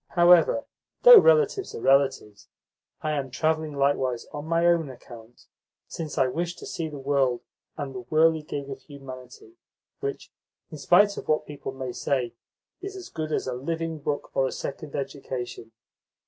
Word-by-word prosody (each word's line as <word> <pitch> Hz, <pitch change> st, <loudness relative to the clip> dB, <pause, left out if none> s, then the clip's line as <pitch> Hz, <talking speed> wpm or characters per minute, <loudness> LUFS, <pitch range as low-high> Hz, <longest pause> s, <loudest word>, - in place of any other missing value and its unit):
However, 175 Hz, -, +5 dB, 0.4 s
though -, -, +11 dB
relatives 460 Hz, -4 st, +3 dB
are -, -, -5 dB
relatives, 135 Hz, -6 st, +1 dB, 0.6 s
I 155 Hz, -, 0 dB
am 140 Hz, -3 st, -2 dB
travelling 155 Hz, +3 st, -1 dB
likewise 135 Hz, -3 st, 0 dB
on 145 Hz, +1 st, -6 dB
my 165 Hz, +1 st, +2 dB
own 170 Hz, -4 st, +3 dB
account, 120 Hz, -2 st, -13 dB, 0.4 s
since 160 Hz, -3 st, -6 dB
I 135 Hz, -, +4 dB
wish 170 Hz, +7 st, -2 dB
to -, -, -11 dB
see 160 Hz, -2 st, -4 dB
the 150 Hz, -, -8 dB
world 135 Hz, -3 st, +1 dB, 0.4 s
and 140 Hz, -3 st, -5 dB
the 125 Hz, -, -6 dB
whirligig 155 Hz, -1 st, +1 dB
of 135 Hz, 0 st, -7 dB
humanity 140 Hz, -, -12 dB, 0.4 s
which, 420 Hz, 0 st, -5 dB, 0.4 s
in 155 Hz, -, -8 dB
spite 200 Hz, +7 st, +4 dB
of -, -, -7 dB
what 155 Hz, 0 st, +1 dB
people 145 Hz, -2 st, -7 dB
may 130 Hz, -1 st, -5 dB
say, 125 Hz, -1 st, -1 dB, 0.5 s
is 390 Hz, 0 st, -6 dB
as 375 Hz, -2 st, -9 dB
good 155 Hz, -1 st, -5 dB
as -, -, -1 dB
a 130 Hz, -, -3 dB
living 160 Hz, +5 st, -3 dB
book 145 Hz, 0 st, -3 dB
or 135 Hz, -1 st, +2 dB
a -, -, -4 dB
second 140 Hz, +1 st, -6 dB
education." 130 Hz, -4 st, -5 dB
145 Hz, 160 wpm, -26 LUFS, 135-165 Hz, 0.6 s, though